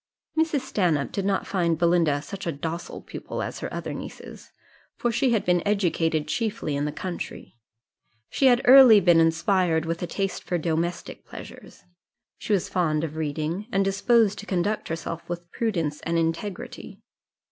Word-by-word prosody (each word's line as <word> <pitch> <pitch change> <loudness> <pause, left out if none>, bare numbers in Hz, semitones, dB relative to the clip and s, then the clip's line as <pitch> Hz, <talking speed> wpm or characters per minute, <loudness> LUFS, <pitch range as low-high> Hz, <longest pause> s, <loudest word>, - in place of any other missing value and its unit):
Mrs. 315 -3 +1
Stanhope 175 - 0
did 195 - -2
not 195 -1 0
find 170 -4 0
Belinda 165 -4 +2
such 195 +4 -7
a - - +1
docile 160 +4 -5
pupil - - -6
as - - -5
her - - -5
other - - -4
nieces, - - -9 0.5
for 240 - 0
she 255 +3 +1
had 225 -3 +1
been 175 -1 +3
educated 165 -6 0
chiefly 215 -5 -2
in 145 +1 -1
the 150 - -2
country; 175 -3 -6 0.7
she 270 - +2
had 245 -1 +4
early 255 -4 +9
been 175 -3 +5
inspired 165 0 +2
with 165 +1 -3
a 175 - -2
taste 195 +2 -3
for 175 - -1
domestic 170 +1 -3
pleasures; - - -12 0.6
she - - -5
was 195 -4 +2
fond 155 -4 0
of 155 -1 -4
reading, 160 +6 -3
and 195 -3 +2
disposed 210 +2 +2
to 210 - -9
conduct 195 +3 -1
herself 165 0 -4
with 175 0 -6
prudence 165 -10 -2
and 170 0 -1
integrity. 200 +6 -4
175 Hz, 165 wpm, -25 LUFS, 165-205 Hz, 0.7 s, early